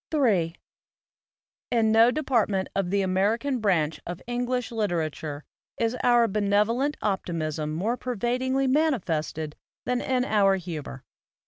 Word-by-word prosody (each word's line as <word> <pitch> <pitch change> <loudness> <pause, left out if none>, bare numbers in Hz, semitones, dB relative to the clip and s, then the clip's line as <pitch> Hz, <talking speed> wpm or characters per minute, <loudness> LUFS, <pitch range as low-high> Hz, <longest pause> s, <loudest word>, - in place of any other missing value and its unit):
Ill 305 -3 +1 1.5
IN 225 -2 +2
no 225 +2 +6
department 235 -9 +1
of 195 -2 0
the 200 +1 +1
American 220 +8 +1
branch 165 -8 +1
of 175 0 -6
English 245 0 -2
literature 160 -8 -2 0.3
is 230 +1 0
our 240 -1 +5
benevolent 210 +7 +1
optimism 160 -6 -2
more 205 +10 -1
pervadingly 255 +3 -1
manifested 175 - 0 0.3
than 250 0 0
in 255 -1 0
our 200 -4 +3
humor. 160 -7 -6
215 Hz, 115 wpm, -26 LUFS, 175-245 Hz, 1.5 s, no